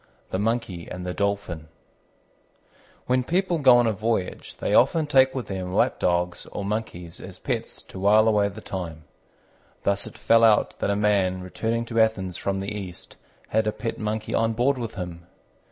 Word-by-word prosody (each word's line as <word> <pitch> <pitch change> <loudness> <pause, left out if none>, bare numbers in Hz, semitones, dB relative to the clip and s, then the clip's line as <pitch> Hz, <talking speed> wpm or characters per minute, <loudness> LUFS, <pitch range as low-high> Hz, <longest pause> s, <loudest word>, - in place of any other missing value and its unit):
THE 95 - -1
MONKEY 105 -6 -2
AND 90 0 -6
THE 90 - -3
DOLPHIN 100 -6 -2 1.4
When 125 0 +2
people 175 +3 0
go 130 -4 +7
on 120 - +4
a 110 - +2
voyage 105 -2 -2
they - - -2
often 160 -2 +4
take 135 -2 +4
with 130 - -3
them 95 -2 -4
lap - - +2
dogs 90 0 0
or 100 - -5
monkeys 100 -5 -4
as - - -9
pets - - -4
to - - -10
wile 105 +3 +5
away 105 -2 +3
the 105 +2 -10
time. 85 -6 -6 0.8
Thus 100 0 +1
it - - -11
fell 115 0 +4
out 110 -2 +4
that - - 0
a 100 - +2
man 100 -3 +2
returning 115 +5 -2
to 115 -1 +1
Athens 95 -5 +1
from 95 +1 -2
the 100 +2 -4
East 95 -4 -8 0.3
had 110 0 +1
a - - +2
pet 115 +1 -5
Monkey 110 0 -3
on 115 0 +2
board 125 +4 +1
with 115 -2 -5
him. 85 -2 -7
105 Hz, 185 wpm, -25 LUFS, 95-115 Hz, 1.4 s, go